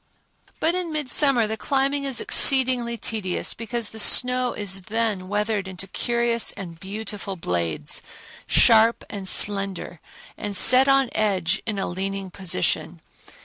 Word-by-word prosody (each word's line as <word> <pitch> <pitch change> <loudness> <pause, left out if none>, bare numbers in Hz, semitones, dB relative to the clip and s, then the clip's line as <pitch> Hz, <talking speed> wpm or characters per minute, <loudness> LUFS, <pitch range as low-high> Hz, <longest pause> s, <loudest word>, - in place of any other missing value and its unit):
But 330 - +1
in 360 -2 -4
midsummer 275 -4 +2
the 220 +1 -4
climbing 275 +4 -1
is 270 -4 -1
exceedingly 250 -3 +3
tedious 210 -6 -3
because 230 -1 -4
the 220 - -8
snow 250 +2 +4
is 195 -2 -4
then 215 -4 -2
weathered 205 0 -2
into 190 0 -7
curious 235 +3 -1
and 170 -5 -9
beautiful 200 0 -6
blades, 85 - -2 0.5
sharp 225 0 +4
and 200 -2 -6
slender, 195 -4 +1 0.4
and 205 -1 -4
set 255 +6 +6
on 270 -2 +3
edge 190 -5 0
in 210 -2 -2
a 195 - -2
leaning 195 +1 -5
position. 180 - -2
215 Hz, 135 wpm, -22 LUFS, 195-245 Hz, 0.5 s, set